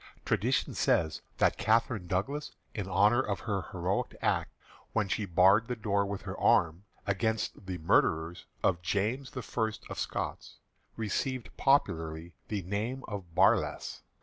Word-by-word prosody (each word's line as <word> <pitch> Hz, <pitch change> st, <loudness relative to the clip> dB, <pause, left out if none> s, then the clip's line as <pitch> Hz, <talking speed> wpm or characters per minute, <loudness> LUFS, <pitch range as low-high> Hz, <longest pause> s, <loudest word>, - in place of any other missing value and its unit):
Tradition -, -, +1 dB
says 80 Hz, -2 st, +1 dB, 0.2 s
that -, -, +2 dB
Catherine 110 Hz, -3 st, +2 dB
Douglas, 135 Hz, -, -2 dB, 0.2 s
in 100 Hz, -4 st, -4 dB
honour 105 Hz, +6 st, +4 dB
of 100 Hz, -6 st, -3 dB
her 100 Hz, -5 st, -2 dB
heroic -, -, -1 dB
act -, -, 0 dB, 0.4 s
when 110 Hz, -3 st, +1 dB
she 105 Hz, +2 st, -1 dB
barred 95 Hz, +5 st, +5 dB
the 125 Hz, -, -2 dB
door 100 Hz, -3 st, 0 dB
with 100 Hz, -1 st, -4 dB
her -, -, -5 dB
arm 85 Hz, +4 st, +3 dB, 0.2 s
against 105 Hz, -1 st, -1 dB
the 90 Hz, -1 st, -3 dB
murderers 80 Hz, +1 st, +1 dB, 0.2 s
of 90 Hz, -2 st, +2 dB
James 105 Hz, +9 st, -1 dB
the 130 Hz, -4 st, -6 dB
First 110 Hz, -2 st, -2 dB
of -, -, -5 dB
Scots, -, -, -4 dB, 0.4 s
received 120 Hz, +3 st, -2 dB
popularly 80 Hz, -, +1 dB
the 105 Hz, -3 st, -3 dB
name 110 Hz, +8 st, -3 dB
of 95 Hz, -6 st, -7 dB
"Barlass." -, -, +2 dB
100 Hz, 145 wpm, -30 LUFS, 90-115 Hz, 0.4 s, barred